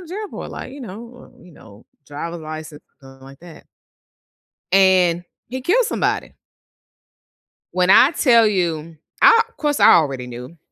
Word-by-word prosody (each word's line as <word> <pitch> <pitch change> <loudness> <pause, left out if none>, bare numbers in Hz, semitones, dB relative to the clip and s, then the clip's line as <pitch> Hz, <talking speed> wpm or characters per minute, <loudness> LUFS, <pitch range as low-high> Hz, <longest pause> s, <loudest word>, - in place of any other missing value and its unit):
to 335 - -14
jail 415 +3 -6
for?" - - -8
Like, 260 - -9
"You 280 - -11
know, 235 +4 -12
uh, - - -20
you 180 - -17
know, 105 -5 -18 0.2
driver's 165 +4 -7
license, 155 -1 -9 0.2
something 135 -1 -16
like 135 +1 -15
that?" 170 -2 -15 1.1
and 185 -3 +3 0.2
he 260 +2 -6
killed 450 - +2
somebody. - - -3 1.4
When 180 0 +1
I 255 +8 +6
tell 235 -8 +3
you, 165 -5 -3 0.2
I 455 0 +6 0.2
'course 295 -2 -1
I - - +7
already 135 -6 0
knew. 125 +7 -10
175 Hz, 150 wpm, -19 LUFS, 150-245 Hz, 1.4 s, I